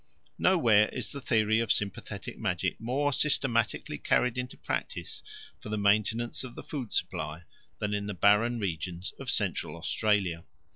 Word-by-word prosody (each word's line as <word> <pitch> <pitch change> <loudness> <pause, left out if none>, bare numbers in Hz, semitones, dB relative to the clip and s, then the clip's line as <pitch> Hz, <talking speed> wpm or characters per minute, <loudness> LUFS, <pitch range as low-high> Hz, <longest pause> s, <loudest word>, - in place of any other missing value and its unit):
Nowhere 115 - +5
is 120 -5 -4
the 140 - -6
theory 110 -2 +2
of 115 -3 +1
sympathetic 100 -2 -3
magic - - -1
more 135 +5 0
systematically 120 -6 +1
carried 125 -2 +2
into 125 0 -4
practice - - -4 0.4
for - - -9
the 105 - -1
maintenance 110 +4 +2
of 125 -2 -8
the - - -8
food 130 -8 -5
supply 75 +2 -2 0.3
than 105 +4 -2
in 100 0 -2
the 100 - -4
barren 105 +6 +4
regions 90 -2 -3
of - - -5
Central 75 - 0
Australia. 95 -2 0
110 Hz, 150 wpm, -29 LUFS, 100-120 Hz, 0.4 s, Nowhere